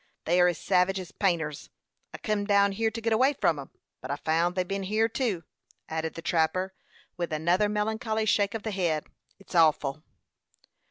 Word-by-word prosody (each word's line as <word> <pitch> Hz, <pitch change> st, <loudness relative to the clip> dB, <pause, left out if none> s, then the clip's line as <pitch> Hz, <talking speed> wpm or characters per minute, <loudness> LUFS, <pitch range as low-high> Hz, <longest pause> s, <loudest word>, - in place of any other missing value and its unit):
They 175 Hz, +2 st, +3 dB
are 180 Hz, -, +6 dB
as 175 Hz, -2 st, 0 dB
savage 190 Hz, +2 st, +2 dB
as 185 Hz, +1 st, -8 dB
painters. 165 Hz, -8 st, -1 dB, 0.4 s
I -, -, -7 dB
kim 215 Hz, -2 st, -1 dB
down 200 Hz, -1 st, +4 dB
hyer 220 Hz, +3 st, 0 dB
to 230 Hz, +1 st, -6 dB
git 225 Hz, 0 st, +1 dB
away 260 Hz, +6 st, +4 dB
from 160 Hz, -, +1 dB
'em, 135 Hz, -, -8 dB, 0.3 s
but 130 Hz, -, -8 dB
I 140 Hz, -, 0 dB
found 165 Hz, +4 st, 0 dB
they'd 185 Hz, -1 st, 0 dB
ben 195 Hz, 0 st, -3 dB
hyer 215 Hz, +3 st, +2 dB
too," 225 Hz, -7 st, -2 dB, 0.5 s
added 160 Hz, 0 st, -3 dB
the 165 Hz, -, -7 dB
trapper, 175 Hz, +3 st, +1 dB, 0.4 s
with 175 Hz, -2 st, -3 dB
another 175 Hz, +7 st, +2 dB
melancholy 220 Hz, +1 st, -1 dB
shake 205 Hz, -1 st, +2 dB
of 220 Hz, -, -4 dB
the 220 Hz, -, -3 dB
head. 170 Hz, -6 st, 0 dB, 0.3 s
"It's 195 Hz, -, -15 dB
awful." 155 Hz, -4 st, +3 dB
185 Hz, 185 wpm, -28 LUFS, 165-210 Hz, 0.5 s, are